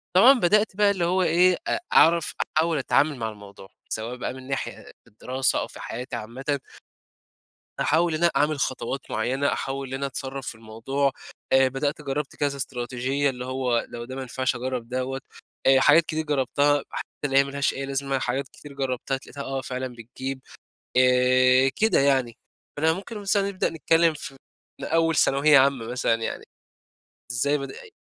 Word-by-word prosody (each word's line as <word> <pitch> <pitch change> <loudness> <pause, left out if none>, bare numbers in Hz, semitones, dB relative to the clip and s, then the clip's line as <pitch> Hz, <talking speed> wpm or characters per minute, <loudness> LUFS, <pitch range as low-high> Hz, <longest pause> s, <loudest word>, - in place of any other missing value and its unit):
طبعًا 245 +7 +7
بدأت 210 +2 +3
بقى 205 0 +4
اللي 180 -4 -1
هو 185 +2 +2
إيه 180 +2 +4
أ - - 0
أعرف 170 0 +5 0.2
أحاول 160 0 +2
أتعامل 145 +1 +2
مع 110 -1 -3
الموضوع، 100 -2 -13 0.2
سواء 115 +3 -3
بقى 125 - -4
من 130 0 -11
ناحية 135 -1 -2
أ - - -15
أ - - -15
الدراسة 130 +4 -1
أو - - -3
في - - -13
حياتي 125 +4 -6
عامةً 135 +6 -3 1.2
أحاول 165 +2 +2
إن 170 - -2
أنا 170 - +5
أعمل 150 +1 +1
خطوات 130 +1 -3
معيّنة، 130 +6 0
أحاول 135 0 -4
إن 130 - -8
أنا 140 +1 -2
أتصرّف 135 0 -5
في - - -5
الموضوع 115 +6 -2 0.4
آآ، 130 0 +6
بدأت 140 +3 -2
جرَّبت 140 0 -3
كذا 140 -1 -1
إستراتيجية، 130 +2 -1
اللي 125 -1 -6
هو 130 -2 -1
لو 120 0 -7
ده 130 +1 -8
ما 135 - -4
نفِعش 130 +1 -1
أجرَّب 125 -1 -4
دوَّة، 130 +1 -3 0.5
آآ، 135 0 +6
حاجات 165 +4 +6
كتير 160 0 -3
جرّبتها، 145 0 +1
حتى - - -5 0.2
اللي 135 -1 +1
هي 140 - +7
ما 140 - -7
لهاش 140 0 0
أي 135 0 -4
لازمة، 135 0 -1
حاجات 130 +2 -2
كتير 145 -1 -13
جرّبتها 135 0 -2
اتلاقيتها 140 +1 -8
آه 135 0 -3
فعلًا 130 -1 -5
بتجيب، 130 +3 -6 0.6
آآ، 130 +1 +5
كده 220 -6 +3
يعني. 130 -4 +2 0.4
فأنا 160 +2 +3
ممكن 200 +5 -7
مثلًا 200 -1 +1
نبدأ 185 - -1
نتكلِّم 165 0 +2
في 135 -2 -8 0.5
من - - -4
أول 165 0 +2
ثانوية 140 +1 +5
عامّة 135 -4 +2
مثلًا 120 -2 +1
يعني، 115 - -4 0.9
إزاي 140 +4 +1
بدأت 140 - -8
ي 445 - -15
135 Hz, 180 wpm, -25 LUFS, 130-150 Hz, 1.2 s, طبعًا